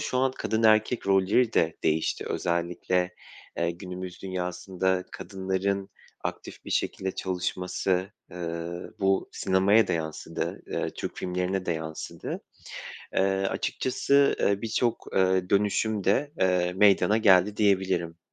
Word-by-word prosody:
şu 125 - -1
an 130 0 +2
kadın 110 -3 -1
erkek 110 +1 +3
rolleri 100 +5 +3
de 80 0 +2
değişti. 80 0 +1
Özellikle, 90 +1 -1 0.4
eee, 85 0 +1
günümüz 90 +1 -7
dünyasında 95 0 -1
kadınların 95 +1 -2 0.3
aktif - - -6
bir - - -8
şekilde 95 0 -1
çalışması, 90 +1 -1 0.2
ııı, 85 0 -5
bu 95 0 +2
sinemaya 95 +3 +3
da - - +1
yansıdı. 80 -2 -4
Iıı, - - -2
Türk - - -5
filmlerine 90 +1 -2
de - - +1
yansıdı. 80 -1 -5 0.7
Eee, - - +1 0.3
açıkçası, 140 +2 +2
ııı, 100 0 +2
birçok, 115 +1 -1
ııı, 95 -1 +2
dönüşüm 105 +1 +1
de, 140 +10 +2
ııı, 90 -1 +2
meydana 105 +2 +5
geldi 100 -1 +5
diyebilirim 95 -5 +1
95 Hz, 120 wpm, -27 LUFS, 90-100 Hz, 0.7 s, meydana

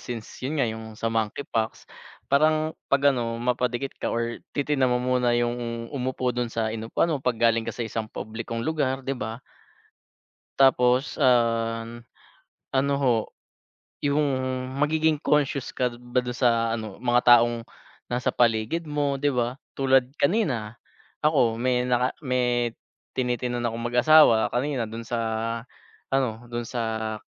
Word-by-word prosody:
since 120 -3 -6 0.2
'yun 135 +5 -3
nga 140 - +2
'yung 110 -1 -6
sa 115 +1 -2
monkeypox, 110 +1 -2 0.5
parang 155 +2 +3 0.2
'pag 140 0 +4
ano 115 -3 -2
mapadikit 125 +2 -1
ka - - -1
or 115 0 -2 0.2
titignan 140 -2 +2
mo 125 - +2
muna 125 -1 +2
'yung 120 -1 -2
umupo 130 -2 -1
dun 120 0 -2
sa 115 -1 -2
inupuan 115 +9 -1
mo 145 - -2
'pag 125 -2 0
galing 115 0 +2
ka - - -4
sa 120 - -2
isang 110 0 -4
publikong 115 +2 -5
lugar, 135 -4 -1
'di 135 - -1
ba? 115 -1 -5 1.2
Tapos, 130 0 +3
um, 115 -3 +2 0.8
ano 140 +1 +1
ho, 130 -4 +3 0.9
'yung 145 +1 +2 0.6
magiging 155 +1 +2
conscious 145 -2 0
ka 125 -1 0
ba 125 +1 -1
dun 125 - -4
sa 115 -2 +2
ano, 110 -3 -7
mga 120 0 +6
taong 120 -1 -2 0.4
nasa 125 0 -1
paligid 120 +8 +1
mo, 145 -2 -1
'di 145 0 +1
ba? 125 +1 -1 0.2
Tulad 135 -2 +3
kanina 135 - 0 0.4
ako, 135 -7 +2
may 125 0 +1
naka 125 0 +1
may 125 -3 +1 0.5
tinitignan 125 -1 -1
akong 115 0 -3
mag-asawa 125 -2 +6
kanina 130 -1 0
dun 115 +2 -7
sa 115 +1 -3 1.0
ano, 120 -3 -1
dun 120 0 -4
sa 110 -2 -3
125 Hz, 140 wpm, -25 LUFS, 115-135 Hz, 1.2 s, mga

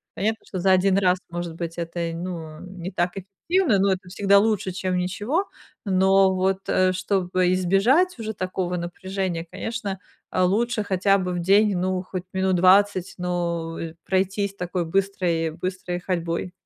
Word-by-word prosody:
Понятно, 220 +4 -1
что 185 - -4
за 190 +1 +3
1 185 +1 +4
раз, 185 -1 +3
может 175 -1 -5
быть, 170 0 -5
это 170 0 -4
й 165 -1 -2
ну 165 -3 -6
не 185 -1 -7
так 175 -1 0
эффективно, 210 - 0
но 195 +1 +3
это 185 0 -7
всегда 200 +1 +4
лучше, 205 -3 0
чем 185 0 -2
ничего. 205 - -1 0.4
Но 190 0 +4
вот, 190 +1 +1
э, 185 0 +3
чтобы 185 -1 0
избежать 220 - +3
уже 220 -1 -4
такого 185 -2 -2
напряжения, 175 0 -3
конечно, 205 -5 -4 0.3
э, - - 0
лучше 215 +5 +1
хотя 195 0 +2
бы 180 -1 -2
в 175 - -2
день, 195 +2 +4
ну 185 0 0
хоть 185 -1 -6
минут 190 0 +1
20, 185 +1 +4
но, 170 -2 -2
э, 165 -1 -5
пройтись 195 +1 0
такой 180 -2 -3
быстрой 175 -3 0
быстрой 180 +1 -4
ходьбой. 170 -1 -2
185 Hz, 160 wpm, -24 LUFS, 175-195 Hz, 0.4 s, 1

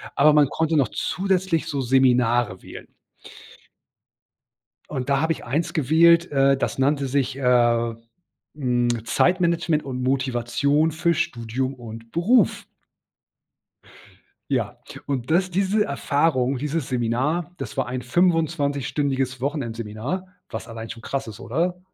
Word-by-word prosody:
aber 150 +2 +6
man 150 -1 +5
konnte 160 +2 0
noch 135 -5 +3
zusätzlich 185 - -1
so 140 -4 -2
Seminare 120 -5 +2
wählen. - - -10 2.0
Und 130 -3 -4
da 140 +1 +2
habe 160 0 +1
ich - - -11
eins 150 +8 -1
gewählt, 165 +4 +4
äh, 135 -1 +3
das 135 - -2
nannte 140 0 +1
sich, 135 0 -1
äh, 120 -3 +2 0.6
hm, 120 -4 0
Zeitmanagement 170 0 +1
und 130 -2 -5
Motivation 135 +4 +1
für 165 +2 +1
Studium 130 -1 -2
und 115 -2 -10
Beruf. 205 +6 +2 1.9
Ja, - - -1 0.3
und 130 -2 -3
das 180 +3 +2
diese 200 +3 +1
Erfahrung, 140 -2 0
dieses 150 +1 -3
Seminar, 130 +8 -1
das - - -7
war 130 - +1
ein 125 +1 -4
fünfundzwanzigstündiges 140 -4 0
Wochenendseminar, 125 - -4 0.2
was 115 0 -6
allein 115 -1 -8
schon 115 0 -9
krass 135 -3 -3
ist, 110 0 -9
oder? 170 +10 -2
135 Hz, 125 wpm, -23 LUFS, 120-160 Hz, 2.0 s, aber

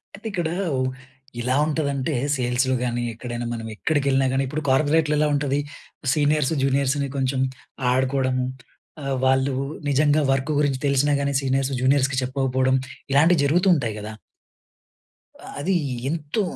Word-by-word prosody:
అయితే 205 +3 -8
ఇక్కడ, 175 -4 -1 0.3
ఉ - - 0 0.6
ఎలా 125 +2 0
ఉంటదంటే 145 -2 -1 0.2
సేల్స్‌లో 125 +1 +1
గాని, 120 -1 -1
ఎక్కడైనా 120 +1 -5
మనం 115 -1 -5
ఎక్కడికెళ్ళినా 140 0 +1
గాని, 135 +1 +1
ఇప్పుడు 150 +4 -4
కార్పొరేట్‌‌లో 150 +3 +3
ఎలా 150 - +3
ఉంటది? 140 0 0 0.5
సీనియర్స్, 150 0 +2
జూనియర్స్‌ని 140 +1 +1
కొంచెం 130 0 0 0.5
ఆడుకోవడం, 130 0 +1 0.7
ఆహ్, 135 -1 -1
వాళ్ళు 130 +1 +2 0.4
నిజంగా 145 +2 +3
వర్క్ 135 +3 0
గురించి 140 -3 +1
తెలిసినా 140 +1 +2
గాని 140 0 -1
సీనియర్స్, 135 0 0
జూనియర్స్‌కి 135 0 +2
చెప్పకపోవడం 130 0 +1 0.4
ఇలాంటివి 160 +3 +5
జరుగుతూ 175 +7 +3
ఉంటాయి 120 -8 -2
కదా! 105 +1 -7 1.5
అది 185 +7 0 0.4
ఎంతో, 155 +6 -2
135 Hz, 125 wpm, -23 LUFS, 130-150 Hz, 1.5 s, ఇలాంటివి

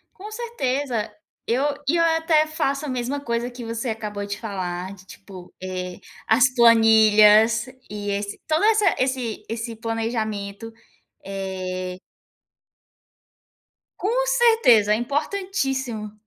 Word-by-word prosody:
Com 415 +3 -10
certeza, 275 - -2 0.4
eu 255 +5 +1 0.2
e 330 - +3
eu 335 - +3
até 325 -1 +3
faço 300 -2 -2
a - - -4
mesma 255 +2 -2
coisa 235 -2 -2
que 245 -1 -9
você 230 +2 -3
acabou 210 -2 -4
de 200 0 -5
falar 185 -3 -4
de, 190 -1 -16
tipo, 190 -3 -12
eh, 185 -1 -5 0.3
as 255 +3 +4
planilhas 225 -1 +6 0.2
e 205 -1 -4
esse 200 0 -4
toda 315 +6 +2
essa 430 -2 +4
esse 255 -4 -2
esse 225 +1 -4
planejamento, 225 -2 -4 0.5
eh 185 -2 -5 2.0
Com 485 +6 0
certeza, 450 - +4
é - - +3
importantíssimo! 270 - -2
230 Hz, 120 wpm, -23 LUFS, 205-280 Hz, 2.0 s, planilhas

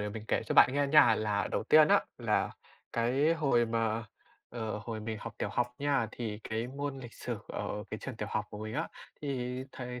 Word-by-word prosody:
để 105 - -2
mình 110 +1 -6
kể - - +2
cho - - -1
bạn - - +8
nghe 145 +1 +2
nha. 140 -6 +7
Là 105 -2 0
đầu - - -1
tiên 155 +4 +7
á, - - +6 0.2
là - - +1 0.4
cái 130 +7 +2
hồi 135 -7 +2
mà, 115 0 0 0.5
ờ, 110 -3 -3
hồi 110 +1 -5
mình 110 0 -4
học 115 0 -7
tiểu - - -1
học 120 0 -1
nha, 140 -5 +1
thì 110 -3 -4
cái 110 +2 -2
môn 140 +1 -4
lịch 120 -3 -9
sử - - -4
ở 105 - -4
cái 110 - -4
trường 130 -4 -6
tiểu 105 -2 -4
học 110 - 0
của 105 - -7
mình 110 +1 -5
á, - - -1 0.3
thì 125 -3 -2
thầy 125 -1 -6
120 Hz, 220 wpm, -31 LUFS, 110-135 Hz, 0.5 s, bạn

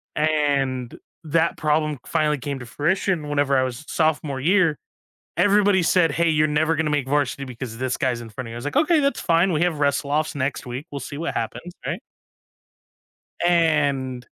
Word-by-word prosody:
And 140 -5 0 0.3
that 160 +2 +1
problem 150 -2 0
finally 150 -2 +1
came 140 +1 -4
to 125 - -8
fruition 160 - -1
whenever 145 -1 +1
I 130 - +4
was 130 +3 -5
sophomore 155 -4 0
year, 170 -2 +3 0.6
everybody 200 +1 +4
said, 165 -3 +3
"Hey, 170 +3 +2
you're 155 -1 +3
never 155 +2 +2
gonna 160 -1 0
make 145 -3 0
varsity 140 -1 0
because 125 -2 -7
this 130 0 -1
guy's 125 -4 -1
in 115 - -9
front 115 +2 -7
of - - -8
you." 115 - -7
I - - -4
was 120 - -8
like, 145 - -4
"Okay, 320 +1 +4
that's 280 0 0
fine, 170 +2 +2
we 155 - +1
have 175 -4 +1
wrestle 140 0 0
offs 155 +1 0
next 135 -1 -2
week, 125 +4 -6
we'll 140 - -5
see 140 +2 -7
what 165 +3 -3
happens," 175 - -4
right? - - -3 1.4
And 145 -7 +1
150 Hz, 190 wpm, -23 LUFS, 135-165 Hz, 1.4 s, I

